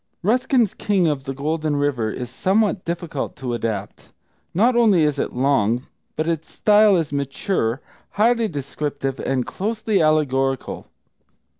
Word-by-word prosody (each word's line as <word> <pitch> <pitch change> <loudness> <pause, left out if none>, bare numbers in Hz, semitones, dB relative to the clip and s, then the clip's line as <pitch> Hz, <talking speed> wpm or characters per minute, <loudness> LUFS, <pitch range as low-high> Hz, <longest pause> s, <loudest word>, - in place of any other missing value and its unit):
Ruskin's 245 +1 +2
King 195 -4 +1
of 145 -3 -1
the 135 - -3
Golden 155 +2 -1
River 140 -6 0
is 125 +2 -6
somewhat 195 - +1
difficult 170 -4 -4
to 125 -1 -4
adapt. 110 -4 -4 0.4
Not 235 +8 +3
only 215 -8 +4
is 150 -2 +1
it - - -1
long, 125 -2 +1 0.3
but 155 +1 -1
its 165 -1 -2
style 210 -2 +5
is 160 -4 -2
mature, 140 - -1 0.3
highly 230 +2 +3
descriptive, 140 -3 -4
and 130 -2 -1
closely 215 - -1
allegorical. 135 -4 0
155 Hz, 135 wpm, -22 LUFS, 135-200 Hz, 0.4 s, style